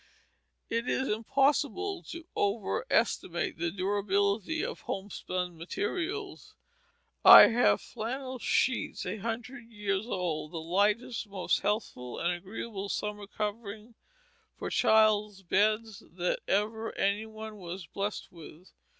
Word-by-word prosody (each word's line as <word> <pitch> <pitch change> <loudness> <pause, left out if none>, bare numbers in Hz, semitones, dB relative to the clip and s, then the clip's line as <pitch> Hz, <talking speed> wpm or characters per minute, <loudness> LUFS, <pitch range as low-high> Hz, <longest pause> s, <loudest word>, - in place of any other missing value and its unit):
It 230 +2 -1
is 265 - 0
impossible 280 - +1
to 335 -1 -7
overestimate 200 -4 0
the 170 0 0
durability 200 - 0
of - - -5
homespun 185 -2 -4
materials. 380 - -4 0.7
I - - +11
have 240 +1 +3
"flannel 255 +3 -5
sheets" 255 +2 0
a 185 +4 -3
hundred 230 +3 -5
years 205 -1 -2
old, 175 -7 -2
the - - -4
lightest, 205 +8 0
most 195 -2 0
healthful, 205 - -2
and 175 +1 0
agreeable 200 +2 -6
summer 210 -1 -3
covering 210 +1 -5 0.6
for - - -5
children's 210 -2 +3
beds 215 +3 +1
that 180 0 -1
ever 220 +3 -1
any 205 +3 +1
one 220 0 -8
was 180 -1 -7
blessed 200 +5 -4
with. 170 0 -13
210 Hz, 115 wpm, -30 LUFS, 190-230 Hz, 0.7 s, I